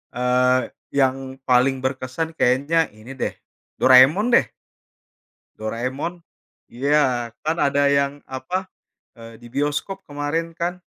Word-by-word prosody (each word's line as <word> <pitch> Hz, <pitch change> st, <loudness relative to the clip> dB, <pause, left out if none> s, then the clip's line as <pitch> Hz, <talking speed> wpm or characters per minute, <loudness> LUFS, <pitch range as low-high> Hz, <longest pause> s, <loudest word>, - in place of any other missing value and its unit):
eee, 125 Hz, +1 st, +3 dB, 0.4 s
yang 130 Hz, -1 st, +3 dB, 0.3 s
paling 130 Hz, +1 st, +4 dB
berkesan 130 Hz, +4 st, -2 dB
kayaknya 140 Hz, +6 st, +2 dB, 0.2 s
ini 110 Hz, +4 st, -11 dB
deh, -, -, -1 dB, 0.5 s
Doraemon 130 Hz, -, +6 dB
deh. -, -, +5 dB, 1.1 s
Doraemon. 130 Hz, +10 st, -4 dB, 0.5 s
Iya, 125 Hz, -2 st, +1 dB
kan 160 Hz, +2 st, -1 dB
ada 140 Hz, -2 st, +2 dB
yang, 140 Hz, 0 st, +1 dB
apa, 180 Hz, +9 st, -4 dB, 0.5 s
eee, 115 Hz, 0 st, -11 dB
di 120 Hz, -, -11 dB
bioskop 145 Hz, +8 st, -2 dB
kemarin 155 Hz, +3 st, -3 dB
kan? 175 Hz, +2 st, -3 dB
140 Hz, 110 wpm, -22 LUFS, 125-155 Hz, 1.1 s, Doraemon